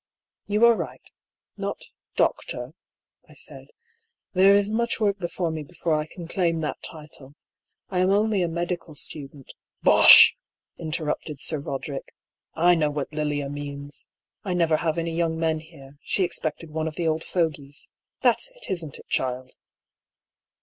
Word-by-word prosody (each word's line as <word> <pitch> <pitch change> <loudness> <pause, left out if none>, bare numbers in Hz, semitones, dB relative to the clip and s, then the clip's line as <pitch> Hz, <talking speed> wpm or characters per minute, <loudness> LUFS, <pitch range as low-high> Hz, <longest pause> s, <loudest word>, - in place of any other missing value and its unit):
"You 210 +3 +4
are 235 - +7
right— 170 -8 -7 0.5
not - - -4 0.4
Doctor^'' 125 +4 -1 0.6
I - - -16
said. - - -9 0.7
"There 190 +1 +6
is 200 0 +4
much 235 +2 0
work 205 -2 +1
before 175 -1 -2
me 160 -1 -4
before 165 +2 -3
I 150 0 0
can 170 0 -9
claim 170 -2 0
that 150 - -4
title. 150 -3 -9 0.5
I 185 - -1
am 185 +1 +3
only 205 0 +2
a 175 - +1
medical 170 -1 -4
student 140 -2 -5
— - - -68
" - - -68
" - - -44
Bosh! - - +10 0.2
" - - -68
interrupted 155 -2 -3
Sir 155 0 0
Koderick. 140 0 -6 0.3
" - - -65
I 175 +2 +5
know 155 -3 +2
what 145 0 -4
Lilia 150 -2 -2
means. 145 0 -8 0.4
I 185 -3 -2
never 165 -3 +2
have 160 0 -1
any 165 0 -2
young 165 -1 0
men 160 -1 0
here; 145 -3 -15
she 195 - 0
expected 165 -2 -3
one 160 +1 -2
of 155 - -5
the 170 -2 -1
old 160 0 0
fogies. 150 -5 -3 0.4
That's - - +3
it, - - -5
isn't 165 -6 -3
it, - - -16
child 130 0 -2
160 Hz, 170 wpm, -25 LUFS, 150-175 Hz, 0.7 s, Bosh